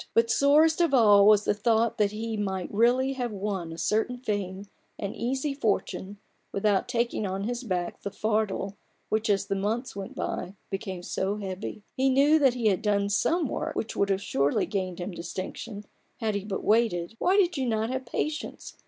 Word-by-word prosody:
But 230 0 +4
sorest 310 +4 +4
of 330 -5 +3
all 205 -4 +7
was 210 -1 +6
the - - +3
thought 225 +1 +1
that 205 -1 +3
he 225 +1 -4
might 190 -3 -3
really 250 +5 +3
have 245 -3 -3
won 195 -4 -3
a 165 - -7
certain 220 +8 0
fame, 200 -5 -3 0.3
an 200 -1 -4
easy 265 +4 -2
fortune, 205 -5 -2 0.3
without 200 -1 +1
taking 235 -3 -1
on 190 +1 -3
his 240 +3 -3
back 180 -6 -3
the - - -3
fardel 210 -2 -1 0.3
which, 215 0 0
as 200 -1 +2
the 200 - -2
months 220 +5 -2
went 195 -1 -6
by, 190 - -4 0.2
became 190 -2 -4
so 195 +3 -2
heavy. 200 +1 -6
He 265 +1 +2
knew 285 +4 +5
that 265 -4 +4
he 240 -2 -3
had 190 - 0
done 200 -1 +1
some 315 - +1
work - - -3
which 225 - -3
would 200 - +1
have 195 0 0
surely 140 -5 +1
gained 185 -4 -3
him 180 +3 -4
distinction, 190 +5 -6 0.3
had 220 -2 -1
he 200 -1 -3
but 200 -2 -4
waited. 215 -4 +2
Why 375 +2 +3
did 355 -3 +3
you 265 -3 -1
not 220 0 0
have 260 -1 -4
patience 305 +5 -4
210 Hz, 190 wpm, -27 LUFS, 195-245 Hz, 0.3 s, all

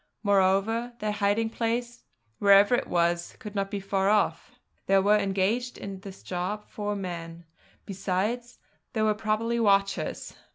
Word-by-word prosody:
Moreover, 200 +4 +2
their 215 -2 -2
hiding 210 +2 0
place, 235 +1 -3 0.3
wherever 200 +2 +6
it 245 - +1
was, 170 0 0
could 210 -2 -9
not 195 -1 -1
be 200 - -3
far 195 0 0
off. 210 0 +1 0.4
There 195 0 +5
were 205 +2 +4
engaged 200 +5 0
in 195 -1 -7
this 195 0 -11
job 185 +4 -4
four 205 -1 -3
men; 170 -3 -6 0.4
besides, 205 +5 -2 0.4
there 220 -2 +1
were 215 - +3
probably 220 +2 -1
watchers. 195 -3 +1
200 Hz, 140 wpm, -27 LUFS, 195-220 Hz, 0.4 s, wherever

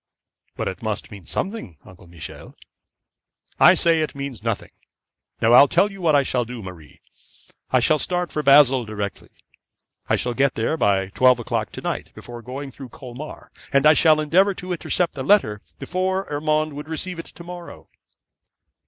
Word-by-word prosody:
'But - - -2
it 95 - -5
must 110 -2 -4
mean 100 -4 -11
something, 190 - -4
Uncle 95 -1 -16
Michel.' 85 -2 -11 1.0
'I - - +8
say 165 -1 +3
it 155 - -3
means 140 -5 -6
nothing. 115 -2 -3 0.7
Now 115 +1 +3
I'll 140 +3 +9
tell 205 +9 +2
you 195 -1 -11
what 160 -4 +3
I 140 - +4
shall 125 -2 0
do, 120 -1 -8
Marie. 90 -5 -12 0.7
I 130 - +3
shall 155 +5 +3
start 180 +2 -1
for 150 - -2
Basle 140 -3 +6
directly. 105 -2 -6 0.8
I - - +4
shall 120 - -1
get 140 +2 +1
there 115 +8 0
by 95 -8 +1
twelve 125 +4 +4
o'clock 115 -4 -3
to - - -7
night - - -4
by - - -10 0.2
going 135 +4 -7
through 130 -1 -11
Colmar, 130 +5 -10 0.2
and 140 +1 +3
I 155 - +8
shall 155 0 +4
endeavour 185 +6 +3
to 185 0 -7
intercept 175 0 -1
the 135 - -6
letter 130 - +3 0.2
before 190 +1 -2
Urmand 155 +1 0
would 145 +2 -8
receive 170 +2 -4
it - - -6
to 170 - -12
morrow.' 175 0 -10
140 Hz, 175 wpm, -22 LUFS, 115-160 Hz, 1.0 s, I'll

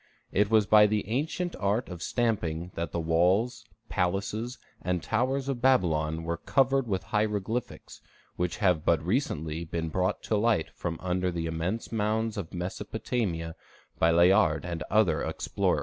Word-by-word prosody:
It 105 +1 +2
was 110 -2 +4
by 105 0 +7
the 105 -2 -1
ancient 160 +8 -1
art 105 +5 0
of 90 -2 -8
stamping 90 -7 -1
that 85 -2 -4
the 85 - -2
walls, 95 +9 +2 0.2
palaces, 100 +6 -1 0.2
and 90 -1 -1
towers 130 +4 0
of 135 -3 -2
Babylon 80 -11 +2
were 85 0 -2
covered 135 - +2
with 95 -3 -1
hieroglyphics, 105 +2 -2 0.3
which 90 0 -2
have 90 -7 +2
but 80 -2 +2
recently 85 - -1
been 80 0 -3
brought 95 +4 -1
to 110 - 0
light 105 -6 +1
from 85 -1 -4
under 90 0 0
the 85 -2 -3
immense 85 +7 -3
mounds 110 0 0
of 100 -6 -5
Mesopotamia 90 -1 -3 0.4
by 80 - +4
Layard 85 0 +4
and 85 -2 -4
other 100 -7 +3
explorers. - - 0
95 Hz, 150 wpm, -28 LUFS, 85-110 Hz, 0.4 s, by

